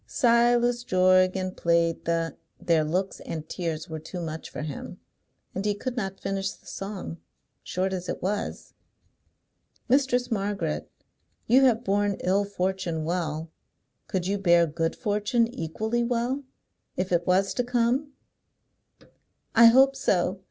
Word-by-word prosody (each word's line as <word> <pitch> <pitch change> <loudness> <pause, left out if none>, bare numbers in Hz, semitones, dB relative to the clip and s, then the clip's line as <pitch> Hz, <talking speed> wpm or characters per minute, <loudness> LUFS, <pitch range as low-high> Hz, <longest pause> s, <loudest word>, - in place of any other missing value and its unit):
Silas 240 0 +3
Jorgan 185 -1 +3
Played 170 -1 +1
the 165 0 -1 0.2
Their 165 -3 +2
looks 180 +5 -2
and 160 -1 -6
tears 165 -2 -4
were 160 -2 -5
too 170 +4 -7
much 160 -1 -5
for - - -6
him, 150 -3 -7 0.5
and 190 - -3
he 205 -1 0
could 250 +4 -4
not 195 -5 -3
finish 195 0 -2
the - - -13
song, 195 -4 -6 0.4
short 190 +1 -2
as 180 -1 -4
it - - -3
was. 205 +2 -3 1.1
"Mistress 250 -2 +2
Margaret, 195 -6 -2 0.6
you 260 +4 +5
have 240 -2 +3
borne 205 -1 +1
ill 195 +3 +2
fortune 185 -4 -2
well. 160 -2 -2 0.6
Could 185 -2 -2
you 200 +2 0
bear 175 -3 +5
good 165 +1 -2
fortune 210 +2 +1
equally 220 +8 -2
well, 245 +3 -1 0.5
if 185 0 -2
it 175 -1 +1
was 190 +2 +3
to 245 - 0
come?" 245 +4 +1 1.4
"I 230 +1 +8
hope 265 +3 +6
so. 185 -7 +1
195 Hz, 140 wpm, -26 LUFS, 170-235 Hz, 1.4 s, I